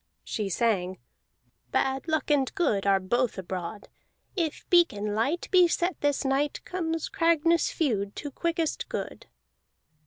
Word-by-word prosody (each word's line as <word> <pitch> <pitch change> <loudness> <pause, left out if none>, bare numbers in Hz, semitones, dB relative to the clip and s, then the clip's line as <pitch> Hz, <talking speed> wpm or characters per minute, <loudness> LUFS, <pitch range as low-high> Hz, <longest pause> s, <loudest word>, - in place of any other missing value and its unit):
She 210 -3 -3
sang: 190 -3 0 0.7
"Bad 265 +2 0
luck 315 -1 0
and 275 -3 +2
good 210 - +1
Are 195 -1 +4
both 240 +6 0
abroad. 185 +2 -5 0.5
If 330 -5 -2
beacon 210 - +3
light 275 +11 0
Be 365 -2 +7
set 350 +2 -1
this 290 -1 +1
night, 275 +2 +1
Comes 325 -3 -2
Cragness 335 0 +2
feud 205 -10 -1
To 290 - -6
quickest 335 +1 -2
good." - - -5
275 Hz, 130 wpm, -27 LUFS, 205-330 Hz, 0.7 s, Be